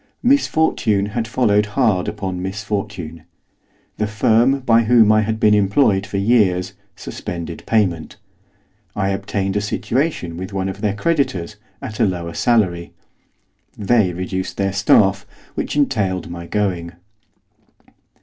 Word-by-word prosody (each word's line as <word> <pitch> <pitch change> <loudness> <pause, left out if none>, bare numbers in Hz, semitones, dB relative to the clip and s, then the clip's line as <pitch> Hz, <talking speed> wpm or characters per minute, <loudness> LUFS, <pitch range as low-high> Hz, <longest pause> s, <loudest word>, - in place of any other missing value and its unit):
Misfortune 160 - +2
had 115 -1 -2
followed 105 -4 +2
hard 105 -9 +2
upon 95 -3 -4
misfortune. 100 -4 -5 0.8
The 105 - -1
firm 115 +6 +2
by 115 -2 +3
whom 115 -2 +5
I 110 0 +4
had 110 +1 -2
been 105 -1 +4
employed 100 0 +2
for 100 - -4
years 95 -4 +2 0.2
suspended 85 -4 -7
payment. 95 -8 0 0.8
I 95 -1 0
obtained 95 0 -2
a - - 0
situation 110 - -2
with 95 +3 -7
one 95 0 -2
of 95 +1 -7
their 105 -2 0
creditors, 105 - -1 0.3
at 110 - -7
a - - +4
lower 85 -3 -4
salary. 90 -8 0 0.8
They 105 -2 +2
reduced 95 +1 -4
their 95 -1 0
staff, 100 0 +3 0.3
which - - -3
entailed 95 -11 0
my 85 0 -7
going. 90 -5 -2
100 Hz, 130 wpm, -19 LUFS, 95-110 Hz, 0.8 s, whom